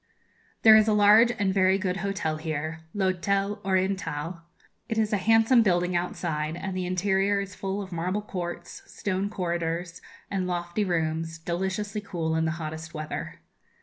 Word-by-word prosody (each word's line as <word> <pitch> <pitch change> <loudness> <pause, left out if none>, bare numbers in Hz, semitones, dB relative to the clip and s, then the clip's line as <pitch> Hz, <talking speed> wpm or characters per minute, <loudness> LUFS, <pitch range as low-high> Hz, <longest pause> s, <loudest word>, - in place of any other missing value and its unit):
There 220 -1 +9
is 215 0 +6
a 215 - +3
large 210 +3 +6
and 195 -2 +1
very 190 0 +4
good 185 -1 -1
hotel 195 -5 -2
here, 155 0 -4 0.2
l'Hôtel 200 +2 0
Oriental. 185 -4 -1 0.5
It 225 - -2
is 215 -1 +1
a - - +4
handsome 225 +4 +5
building 180 -3 +2
outside, 160 -3 -2
and 185 +2 -5
the 185 -1 -2
interior 195 +2 +1
is 195 -1 -5
full 195 +2 -3
of 190 - -11
marble 180 +5 -2
courts, 175 -4 -6
stone 195 0 -2
corridors, 170 -2 -3 0.3
and 190 -2 -1
lofty 175 +3 -1
rooms, 165 -2 -1
deliciously 190 +5 -3
cool 165 -5 -2
in 160 0 +1
the 160 - +1
hottest 160 +1 -6
weather. 155 0 -5
185 Hz, 155 wpm, -27 LUFS, 170-200 Hz, 0.5 s, There